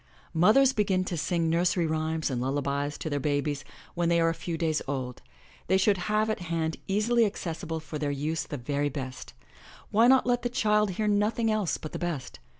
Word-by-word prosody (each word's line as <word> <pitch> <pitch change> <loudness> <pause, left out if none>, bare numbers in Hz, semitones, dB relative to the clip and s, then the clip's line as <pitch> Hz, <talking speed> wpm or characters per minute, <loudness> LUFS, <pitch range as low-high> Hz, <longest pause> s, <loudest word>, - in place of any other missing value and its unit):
Mothers 220 +11 +5
begin 195 -4 +1
to 185 - -3
sing 165 +1 0
nursery 175 +1 +2
rhymes 160 -1 -1
and 125 -2 -2
lullabies 140 +2 -1
to - - -5
their 145 -2 -1
babies 145 0 -1 0.3
when 170 -1 0
they 170 0 +3
are 165 0 +3
a - - 0
few 165 0 -4
days 160 -2 0
old. 130 -3 -4 0.5
They 190 - +4
should 195 0 +3
have 215 +1 +2
at 220 - -1
hand 165 -2 -2
easily 225 +4 +2
accessible 165 -5 -3
for 155 -1 -7
their 145 -1 -1
use 150 +2 -2
the 145 - -4
very 145 +3 -1
best. 130 -2 -7 0.6
Why 225 +3 +5
not 260 0 +5
let 245 0 +1
the 245 - -1
child 210 -3 +2
hear 215 - 0
nothing 215 +2 +2
else 210 -5 0
but 155 - -8
the - - -5
best? 170 -7 -4
165 Hz, 200 wpm, -28 LUFS, 145-210 Hz, 0.6 s, Mothers